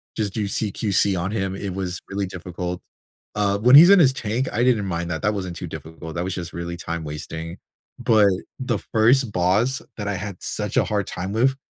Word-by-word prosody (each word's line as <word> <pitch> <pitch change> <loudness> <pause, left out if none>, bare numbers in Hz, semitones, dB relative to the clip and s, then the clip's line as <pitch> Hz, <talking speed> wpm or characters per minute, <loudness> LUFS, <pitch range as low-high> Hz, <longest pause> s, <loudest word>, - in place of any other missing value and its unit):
just 105 -3 -2
do 110 -2 -1
CQC 100 -1 0
on 90 +3 -2
him, 95 -3 -2
it 95 -1 -4
was 90 -2 -3
really 100 +1 -2
difficult. 90 -1 -5 0.5
Uh, 100 -1 +1
when 125 +5 +6
he's 165 +5 +10
in 200 - +8
his 135 -6 +5
tank, 125 +1 -2
I 120 - +1
didn't 120 -5 +3
mind 85 -2 -3
that, 80 - -4
that 105 +2 +2
wasn't 95 -4 -4
too - - -5
difficult, 80 +1 -8
that 85 - -1
was 95 0 -3
just 85 -2 -6
really 85 0 -5
time 85 -1 -4
wasting. 80 +2 -6 0.4
But, 110 -4 +4 0.3
the 125 -4 -1 0.2
first 120 +2 +4
boss 100 +9 +1 0.2
that 105 -2 -4
I 105 - -1
had 100 -1 -5
such - - -3
a - - +5
hard 105 -2 -1
time 95 +2 -4
with 130 +4 +2
100 Hz, 210 wpm, -23 LUFS, 90-110 Hz, 0.5 s, he's